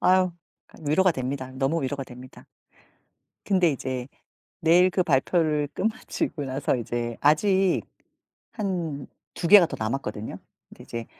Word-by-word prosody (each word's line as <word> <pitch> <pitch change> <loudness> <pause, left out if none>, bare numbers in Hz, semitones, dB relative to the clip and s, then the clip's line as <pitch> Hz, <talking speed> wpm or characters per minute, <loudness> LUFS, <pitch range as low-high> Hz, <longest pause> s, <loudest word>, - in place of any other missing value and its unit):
아유 185 -1 +4 0.4
아 - - -25
위로가 180 +5 +4
됩니다. 130 -1 -4
너무 135 +4 0
위로가 135 +1 -3
됩니다. 125 0 -13 1.0
근데 185 -4 +3
이제 130 -2 -4 0.5
내일 175 +3 +5
그 185 0 +1
발표를 150 0 +1
끝마치고 195 -7 -2
나서 135 +1 -1
이제 120 0 -3
아직 190 +5 +3 0.7
한 170 - -3 0.3
2 170 - -3
개가 200 -1 +9
더 - - -6
남았거든요. 110 -2 -3 0.3
근데 - - -14
이제 115 -1 -6
145 Hz, 270 characters per minute, -25 LUFS, 130-180 Hz, 1.0 s, 개가